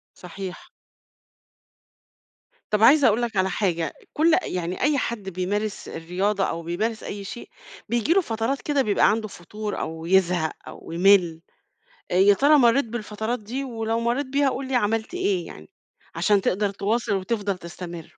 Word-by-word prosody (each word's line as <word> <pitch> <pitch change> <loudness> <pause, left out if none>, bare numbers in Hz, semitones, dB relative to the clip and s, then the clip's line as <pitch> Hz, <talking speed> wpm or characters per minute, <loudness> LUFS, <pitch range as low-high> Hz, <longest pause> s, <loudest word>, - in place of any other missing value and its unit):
صحيح. 185 +1 -8 2.0
طب 210 0 +2
عايزة 275 +4 +7
أقول 225 +2 +2
لك 230 -3 -2
على 190 0 +2
حاجة، 170 -6 -1 0.2
كُلّ 320 +2 +3
يعني 180 0 -3
أي 290 +2 +3
حد 225 -7 -3
بيمارس 200 +4 -3
الرياضة 190 +4 -1
أو 170 - -2
بيمارس 215 +7 -2
أي 200 0 -6
شيء 230 +4 -8 0.4
بييجي 240 +7 +2
له 390 - +4
فترات 230 0 -2
كده 290 -2 +1
بيبقى 210 -5 +3
عنده 215 0 0
فتور 210 +3 -6
أو 160 +1 -5
يزهق 180 -3 +2 0.2
أو - - -10
يملّ، 175 -2 +4 0.7
آآ، - - 0
يا 200 +2 +6
ترى 290 +7 +5
مرّيت 250 +1 +4
بالفترات 220 +1 -4
دي؟ 240 +6 -5
ولو 225 -3 -2
مرّيت 240 +5 0
بيها 275 +1 +1
قُل 265 0 -4
لي 265 - -1
عملت 225 +4 0
إيه 375 0 -1
يعني، - - -12 0.5
عشان 205 -2 +3
تقدَر 200 +2 0
تواصِل 210 +3 -1
وتفضَل 200 0 -2
تستمر. 170 -1 -8
210 Hz, 155 wpm, -24 LUFS, 185-240 Hz, 2.0 s, عايزة